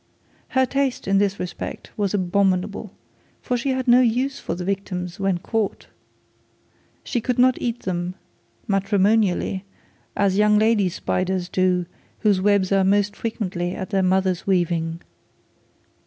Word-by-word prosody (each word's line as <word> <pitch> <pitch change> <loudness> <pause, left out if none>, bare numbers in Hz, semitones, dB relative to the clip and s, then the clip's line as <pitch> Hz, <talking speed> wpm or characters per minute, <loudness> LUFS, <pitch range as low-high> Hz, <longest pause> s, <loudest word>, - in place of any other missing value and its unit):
Her 260 - +5
taste 270 -3 -1
in 195 0 +3
this 200 -1 0
respect 180 -1 -6
was 205 -1 0
abominable, 195 +1 0 0.5
for 250 - -2
she 265 +3 -1
had 260 0 -1
no 245 +1 +7
use 255 +3 +1
for 165 - -4
the 180 0 -5
victims 185 -2 -3
when 195 -2 +1
caught. 215 +3 -2 1.2
She 240 - -2
could 250 +2 -1
not 255 0 +4
eat 240 0 -2
them 180 0 -3 0.5
matrimonially 195 -1 +1 0.5
as 200 -1 +2
young 210 0 +5
lady 215 -3 +3
flies 185 +1 -2
do 180 -1 +1 0.4
whose 205 -3 +3
webs 200 -1 +2
are 195 -1 +4
most 205 +1 +2
frequently 185 -6 -3
of 190 - -5
their 195 -2 +1
mother's 185 -1 +1
weaving. 170 -3 0
195 Hz, 140 wpm, -22 LUFS, 185-220 Hz, 1.2 s, no